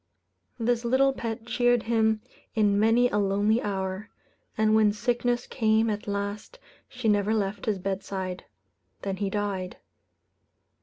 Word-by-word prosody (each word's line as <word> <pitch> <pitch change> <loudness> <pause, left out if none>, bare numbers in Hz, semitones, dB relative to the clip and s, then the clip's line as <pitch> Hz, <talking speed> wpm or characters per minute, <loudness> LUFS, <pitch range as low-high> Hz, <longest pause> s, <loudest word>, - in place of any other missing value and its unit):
This 235 0 0
little 265 +3 +3
pet 225 -2 -5
cheered 245 0 +2
him 220 -1 +2 0.3
in 205 -2 +3
many 225 +3 +4
a 210 - 0
lonely 205 +3 +2
hour; 190 +1 -3 0.5
and 215 0 +3
when 215 -1 +5
sickness 240 +2 0
came 220 -1 +2
at 210 0 -5
last, 205 - -4 0.3
she 250 -3 -4
never 210 +1 +2
left 200 -1 -2
his 210 -2 +1
bedside. 190 -1 -4 0.6
Then 195 -1 -2
he 200 0 -1
died. 195 -3 -3
215 Hz, 135 wpm, -27 LUFS, 200-230 Hz, 0.6 s, when